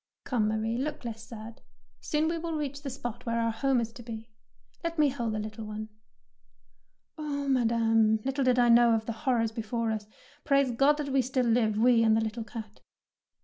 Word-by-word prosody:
''Come, 230 -5 +1
Marie, 220 +2 -1
look 290 -1 -4
less 225 -1 -5
sad; 225 0 -10 0.4
soon 305 +1 0
will 330 0 -2
we - - -1
reach 285 -1 -4
the 285 - -4
spot 240 -2 -6
where 230 0 0
our 230 0 +1
home 265 +3 +1
is 230 -1 -3
to 240 - -10
be. 225 -1 -8 0.5
Let 335 0 -3
me 300 -2 +4
hold 240 -5 -2
the - - -2
little 215 +1 -6
one.^' 215 0 -6 1.3
"Oh, 285 -2 -3
Madame, 225 -3 +3
little 270 +1 0
did 255 -1 +3
I 245 -1 +5
know 235 0 +6
of 220 0 -2
the 230 - -2
horrors 230 -2 0
before 225 +1 -2
us! 215 -1 -4 0.4
Praise 275 -2 +3
Ood 235 - -8
that 290 +1 +3
we 270 0 +3
still 255 0 0
live, 225 -2 +2
we 235 +1 +5
and 220 -1 +4
the - - +2
little 220 +1 -3
cat." 220 -2 -9
235 Hz, 200 wpm, -29 LUFS, 220-270 Hz, 1.3 s, know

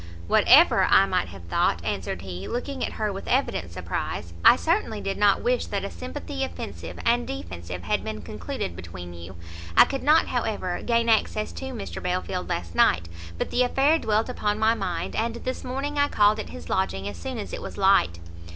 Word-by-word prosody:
"Whatever - - +6
I - - +6
may - - 0
have 90 0 -11
thought," 85 - 0
answered 90 0 -3
he, 95 0 -6
looking 260 +2 -3
at - - -2
her 210 -2 -2
with 195 - -7
evident 95 - 0
surprise, 85 -1 -4
"I - - +9
certainly 320 - 0
did 195 -1 -3
not 205 -1 +3
wish 245 0 +1
that 200 -1 -2
a - - -5
sympathy 85 +1 -5
offensive 85 0 -6
and 80 - +2
defensive 90 0 -6
had - - 0
been - - -5
concluded 85 - -5
between 90 0 -8
you. 85 +2 -10 0.4
I - - +10
could 270 - -4
not, 305 +3 +5
however, 215 -7 -2
gain 235 -1 +1
access 215 -1 +1
to - - -7
Mr 245 -6 -6
Belfield 180 0 -2
last 85 -1 -3
night, 85 +1 +3 0.3
but - - -3
the 250 - +2
affair 275 +5 +3
dwelt 215 -3 +1
upon 210 -4 -1
my 220 +1 +3
mind, 175 -7 -3
and 230 +1 -1
this 255 +2 -4
morning 275 +3 -3
I 285 - +4
called 210 -4 +3
at - - -5
his 85 0 -9
lodging 95 +2 -1
as 100 -3 -6
soon 85 - -5
as - - -6
it - - -4
was - - -7
light." 85 0 +4
185 Hz, 195 wpm, -25 LUFS, -, 0.4 s, I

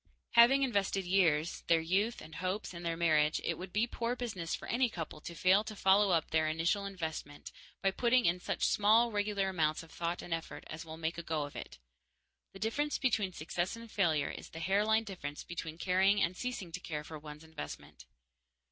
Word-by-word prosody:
Having 255 +4 +7
invested 200 -6 0
years, 170 -4 +2
their 165 -1 +5
youth 195 +8 0
and 160 - -11
hopes, 185 +4 -3
in 170 - -7
their 165 -1 -2
marriage, 155 -2 +3
it - - 0
would 185 0 -7
be 215 +4 +2
poor 235 0 -2
business 215 -10 -3
for - - -9
any 245 +1 +2
couple 165 -6 -6
to 170 - -7
fail 185 +5 +4
to 215 0 -7
follow 195 +1 +4
up 165 -4 +1
their 160 0 +3
initial 165 +6 0
investment 160 -6 -6 0.3
by 195 - +3
putting 240 +4 +3
in 175 +1 +3
such - - -1
small 225 +3 +4
regular 205 -2 0
amounts 160 -3 0
of 165 - -15
thought 170 +1 -3
and 175 - -4
effort 165 0 -5
as 155 +1 -7
will 160 -1 -9
make 165 +1 -2
a - - -6
go 155 -2 -1
of 145 - -8
it. 60 - -8 0.7
The - - -11
difference 285 +9 -1
between 215 -7 +1
success 175 +4 -3
and 230 -1 -11
failure 160 -7 +1
is - - -9
the 165 - -8
hairline 210 +6 +2
difference 175 -9 -6
between 165 -2 -6
caring 190 +3 +3
and 185 -2 +1
ceasing 220 -6 -4
to 180 - -5
care 150 -4 -5
for 155 0 -8
one's 150 +1 -10
investment. 160 - -9
180 Hz, 200 wpm, -33 LUFS, 160-210 Hz, 0.7 s, Having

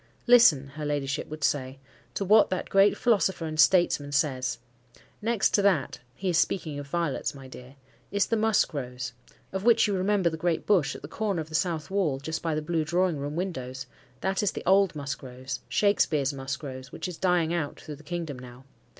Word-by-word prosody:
"Listen," 230 - +6
her 150 +2 -8
ladyship 145 -1 -2
would 155 -1 -7
say, 135 -1 0 0.4
"to 195 - -1
what 210 +3 +5
that 185 - -3
great 195 +1 +5
philosopher 195 -7 +1
and 155 -1 -5
statesman 150 -3 +4
says. 130 -4 0 0.6
'Next 225 -1 +1
to 205 - +3
that,'—he 155 -4 -1
is 175 -3 +3
speaking 155 -6 -1
of 145 - -8
violets, 165 -2 -2
my 135 -1 -11
dear,—'is 130 +10 -5
the 230 - 0
musk 220 -5 +2
rose,'—of 125 +7 -7
which 230 0 +5
you 205 - 0
remember 190 0 +1
the 160 - -5
great 170 0 -1
bush, 185 -9 +2
at - - -10
the - - -6
corner 200 +1 -2
of 155 -1 -5
the - - -13
south 160 -1 -1
wall 185 -9 +1
just 160 +4 -4
by 165 -2 -1
the 155 - -2
Blue 160 0 0
Drawing 175 +1 +1
room 145 +2 -4
windows; 130 -8 -4 0.4
that 190 0 0
is 205 - 0
the - - -7
old 195 -1 +4
musk 140 -1 -5
rose, 130 -1 -6
Shakespeare's 155 -9 +2
musk 135 +1 -5
rose, 130 -1 -8
which - - -5
is 180 - -6
dying 175 -3 +1
out 160 -4 -3
through 150 -2 -9
the - - -15
kingdom 160 -4 -5
now. 125 +1 -12
155 Hz, 195 wpm, -27 LUFS, 135-190 Hz, 0.6 s, Listen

